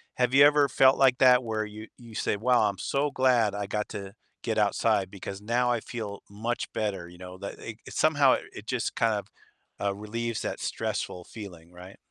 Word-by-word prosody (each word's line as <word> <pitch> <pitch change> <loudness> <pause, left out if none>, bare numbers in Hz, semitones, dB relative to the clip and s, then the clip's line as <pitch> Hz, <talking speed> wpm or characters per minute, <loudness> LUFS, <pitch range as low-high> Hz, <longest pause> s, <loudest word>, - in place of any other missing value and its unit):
have 125 0 +1
you 140 +1 +8
ever 145 -1 +5
felt 135 -1 +5
like 130 -2 +4
that 125 -1 +6
where 110 -2 -2
you 105 +1 -9
you 120 -2 -13
say, - - 0
"Wow, 120 +1 +3
I'm 100 - -6
so 140 +9 -1
glad 125 -6 +2
I 105 0 -3
got 105 +1 -2
to 100 -1 -7 0.3
get - - -1
outside 95 -2 +2
because 100 0 -8
now 120 +3 +1
I 120 - +1
feel 110 -3 -6
much 115 +4 -3
better," 100 -5 -2
you 90 0 -14
know? 90 0 -10
That 100 +1 -7
it - - -8
somehow - - +4 0.2
it - - -10
just - - -1
kind 115 -1 +2
of, 105 -1 -3 0.5
uh, 100 -1 -1
relieves 115 +2 -4
that - - -4
stressful 90 - -3
feeling, 90 -5 -11
right? 90 +2 -12
110 Hz, 200 wpm, -27 LUFS, 100-125 Hz, 0.5 s, you